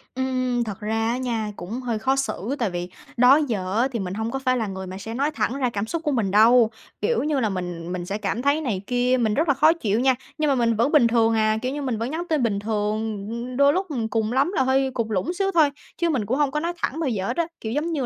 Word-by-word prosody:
Ừm, 255 Hz, -2 st, 0 dB
thật 210 Hz, -3 st, -6 dB
ra 225 Hz, +1 st, -1 dB
á 245 Hz, -, -1 dB
nha, 230 Hz, -4 st, -2 dB
cũng 220 Hz, +9 st, -6 dB
hơi 235 Hz, -3 st, -2 dB
khó 265 Hz, +4 st, +1 dB
xử 270 Hz, -2 st, -2 dB
tại 230 Hz, -, +1 dB
vì 175 Hz, 0 st, -4 dB, 0.3 s
đó 250 Hz, +3 st, +7 dB
giờ 195 Hz, -4 st, -2 dB
á, 260 Hz, -, +3 dB
thì 235 Hz, -, -3 dB
mình 185 Hz, -2 st, -4 dB
hông 220 Hz, +3 st, -3 dB
có 270 Hz, -, -2 dB
phải 255 Hz, -1 st, +1 dB
là 225 Hz, -3 st, -1 dB
người 190 Hz, -1 st, -6 dB
mà 185 Hz, -, -7 dB
sẽ 220 Hz, +3 st, -7 dB
nói 280 Hz, +5 st, 0 dB
thẳng 270 Hz, -3 st, -1 dB
ra 255 Hz, -3 st, +1 dB
cảm 205 Hz, -3 st, -3 dB
xúc 335 Hz, +3 st, -3 dB
của 300 Hz, -, 0 dB
mình 220 Hz, -8 st, 0 dB
đâu, 225 Hz, +2 st, +6 dB, 0.3 s
kiểu 470 Hz, -10 st, +1 dB
như 300 Hz, -2 st, 0 dB
là, 220 Hz, -4 st, +1 dB
mình 175 Hz, -3 st, -4 dB
mình 180 Hz, -1 st, -4 dB
sẽ 200 Hz, +3 st, -3 dB
cảm 215 Hz, +2 st, -2 dB
thấy 285 Hz, +4 st, +2 dB
này 215 Hz, -10 st, -2 dB
kia, 250 Hz, +1 st, +2 dB
mình 220 Hz, -3 st, +1 dB
rất 315 Hz, +9 st, +1 dB
là 285 Hz, -, +4 dB
khó 310 Hz, +4 st, +5 dB
chịu 220 Hz, -10 st, -1 dB
nha, 260 Hz, 0 st, +3 dB, 0.2 s
nhưng 305 Hz, -, +1 dB
mà 280 Hz, -, +3 dB
mình 230 Hz, -2 st, +2 dB
vẫn 235 Hz, +7 st, +1 dB
bình 290 Hz, -7 st, +5 dB
thường 230 Hz, -1 st, +3 dB
à, 215 Hz, 0 st, +2 dB
kiểu 255 Hz, +1 st, -2 dB
như, 290 Hz, -, -4 dB
mình 255 Hz, -5 st, -2 dB
vẫn 230 Hz, +4 st, -3 dB
nhắn 330 Hz, +3 st, -2 dB
tin 300 Hz, -6 st, +1 dB
bình 205 Hz, -3 st, 0 dB
thường, 210 Hz, -1 st, -2 dB
ư, 240 Hz, +2 st, -5 dB
đôi 280 Hz, +2 st, +5 dB
lúc 375 Hz, +1 st, -1 dB, 0.2 s
cùng 220 Hz, 0 st, 0 dB
lắm 275 Hz, +8 st, +2 dB
là -, -, +3 dB
hơi 265 Hz, +1 st, +2 dB
cụt 230 Hz, -3 st, -1 dB
lủn 215 Hz, -, -1 dB
xíu 390 Hz, +1 st, 0 dB
thôi, 315 Hz, -4 st, +5 dB, 0.3 s
chứ 340 Hz, -1 st, +1 dB
mình 255 Hz, -9 st, 0 dB
cũng 255 Hz, +7 st, 0 dB
hông 290 Hz, -2 st, +2 dB
có 300 Hz, -, -1 dB
nói 340 Hz, +2 st, -2 dB
thẳng 320 Hz, -2 st, -2 dB
bao 310 Hz, -5 st, 0 dB
giờ 195 Hz, -4 st, -2 dB
hết 240 Hz, -, -3 dB
á. 335 Hz, -, +1 dB
Kiểu, 220 Hz, -, -4 dB
giống 305 Hz, +4 st, -1 dB
như 285 Hz, -5 st, -1 dB
240 Hz, 290 wpm, -23 LUFS, 215-275 Hz, 0.3 s, đó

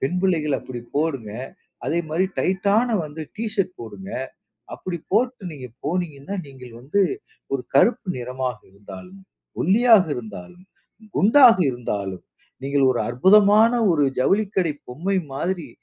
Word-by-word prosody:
பெண் 155 Hz, +7 st, -1 dB
பிள்ளைகள் 160 Hz, -7 st, +1 dB
அப்பிடி 125 Hz, -2 st, -8 dB, 0.2 s
போடுங்க. 135 Hz, -9 st, -1 dB, 0.5 s
அதேமாரி 170 Hz, +2 st, 0 dB
டைட்டான 200 Hz, +5 st, +2 dB, 0.2 s
வந்து 155 Hz, +1 st, -7 dB
டி 225 Hz, -, -3 dB
ஷர்ட் 195 Hz, -4 st, 0 dB
போடுங்க. 100 Hz, -4 st, -9 dB, 0.6 s
அப்பிடி 180 Hz, -2 st, -5 dB
போட்டு 245 Hz, +1 st, +1 dB
நீங்க 135 Hz, -4 st, -8 dB, 0.2 s
போனீங்கன்னா, 155 Hz, 0 st, -3 dB
நீங்கள் 125 Hz, -3 st, -12 dB
வந்து 145 Hz, +11 st, 0 dB, 0.5 s
ஒரு 135 Hz, -, -2 dB
கருப்பு 220 Hz, -, +3 dB
நிறமாக 125 Hz, -1 st, -4 dB
இருந்தாலும், 95 Hz, -1 st, -12 dB, 0.4 s
ஒல்லியாக 220 Hz, +2 st, +5 dB
இருந்தாலும், 110 Hz, -, -9 dB, 0.5 s
குண்டாக 230 Hz, +3 st, +7 dB
இருந்தாலும், 100 Hz, -6 st, -4 dB, 0.4 s
நீங்கள் 140 Hz, 0 st, +2 dB
ஒரு 125 Hz, -, 0 dB
அற்புதமான 205 Hz, -, +5 dB, 0.2 s
ஒரு 150 Hz, -3 st, +2 dB
ஜவுளிக்கடை 190 Hz, +2 st, +1 dB, 0.2 s
பொம்மை 175 Hz, +11 st, -2 dB, 0.2 s
மாதிரி, 170 Hz, +1 st, -3 dB
155 Hz, 120 wpm, -22 LUFS, 125-195 Hz, 0.6 s, குண்டாக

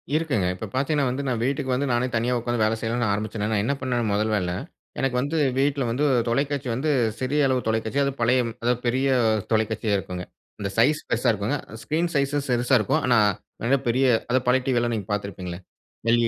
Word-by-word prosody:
இருக்குங்க 150 Hz, -, +1 dB
இப்போ 90 Hz, -, -6 dB
பார்த்திங்கன்னா 140 Hz, +1 st, +1 dB
வந்து 130 Hz, +3 st, -3 dB
நான் 120 Hz, -3 st, -1 dB
வீட்டுக்கு 135 Hz, 0 st, -1 dB
வந்து, 140 Hz, +2 st, 0 dB
நானே 120 Hz, +1 st, +2 dB
தனியா 120 Hz, +2 st, +1 dB
உட்கார்ந்து 120 Hz, -1 st, 0 dB
வேலை 110 Hz, +1 st, +1 dB
செய்யனும்னு 115 Hz, 0 st, -1 dB
ஆரம்பிச்சேனா, 105 Hz, 0 st, -2 dB
நான் 105 Hz, -2 st, +1 dB
என்ன 140 Hz, -, +1 dB
பண்னுவேனா 125 Hz, -3 st, -1 dB
முதல 105 Hz, +2 st, +1 dB
வேல, 90 Hz, -4 st, -1 dB, 0.5 s
எனக்கு 135 Hz, -2 st, 0 dB
வந்து 145 Hz, +5 st, -1 dB, 0.2 s
வீட்டில 140 Hz, 0 st, +1 dB
வந்து 130 Hz, +6 st, 0 dB, 0.2 s
தொலைக்காட்சி 140 Hz, +2 st, -1 dB
வந்து 145 Hz, +6 st, -1 dB, 0.3 s
சிறிய 140 Hz, +3 st, +1 dB
அளவு 130 Hz, -1 st, 0 dB
தொலைக்காட்சி 110 Hz, +4 st, 0 dB
அதுவும் 140 Hz, 0 st, -2 dB
பழைய 125 Hz, +2 st, +3 dB, 0.2 s
அதாவது 120 Hz, 0 st, +1 dB
பெரிய 130 Hz, +3 st, +1 dB, 0.5 s
தொலைக்காட்சியா 110 Hz, -1 st, +1 dB
இருக்குங்க, 90 Hz, -2 st, -5 dB, 0.4 s
அந்த 100 Hz, -1 st, -2 dB
சைஸ் 150 Hz, +7 st, +3 dB
பெருசா 120 Hz, -, +1 dB
இருக்குங்க. 105 Hz, +8 st, -1 dB, 0.3 s
ஸ்கிரீன் 165 Hz, +3 st, 0 dB
சைஸ் 140 Hz, 0 st, +1 dB
சிறுசா 125 Hz, +2 st, +2 dB
இருக்கும் 105 Hz, -, +1 dB
ஆனா, 120 Hz, -3 st, +4 dB, 0.5 s
மிகபெரிய 130 Hz, 0 st, +2 dB, 0.3 s
அத 130 Hz, -, +4 dB
பழைய 130 Hz, +1 st, +4 dB
டிவியிலா 120 Hz, -2 st, +1 dB
நீங்க 100 Hz, -3 st, -5 dB
பார்த்திருப்பீங்களே 95 Hz, -3 st, -5 dB, 0.6 s
ல். 120 Hz, -, +2 dB
125 Hz, 180 wpm, -24 LUFS, 110-135 Hz, 0.6 s, ஆனா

